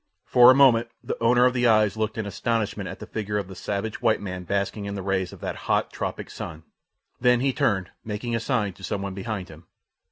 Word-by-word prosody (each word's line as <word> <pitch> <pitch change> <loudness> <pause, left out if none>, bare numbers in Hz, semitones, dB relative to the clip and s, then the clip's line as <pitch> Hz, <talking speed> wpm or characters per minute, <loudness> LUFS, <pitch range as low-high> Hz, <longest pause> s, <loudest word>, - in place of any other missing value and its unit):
For 125 0 +7
a 130 - +8
moment 120 -4 +5
the - - -3
owner 120 +2 +5
of 125 - +3
the 125 -1 +2
eyes 110 -3 +4
looked 110 0 -2
in 110 - -2
astonishment 110 +1 -2
at - - -7
the - - -8
figure 105 -1 -3
of 100 -3 -3
the 95 - -9
savage 100 +3 -4
white - - +3
man 90 -2 -6
basking 100 +2 -2
in 100 0 -4
the 95 - -5
rays 95 -1 -1
of - - -13
that - - -3
hot, - - +1
tropic - - -4
sun; 80 0 -7 0.6
then 125 -1 +4
he 135 +1 +1
turned, 95 -6 0
making 110 +2 -3
a - - 0
sign 115 -5 -1
to 95 - -16
some 100 0 -3
one 100 -1 -4
behind 100 -1 -4
him. 80 +1 -14
105 Hz, 230 wpm, -25 LUFS, 95-120 Hz, 0.6 s, a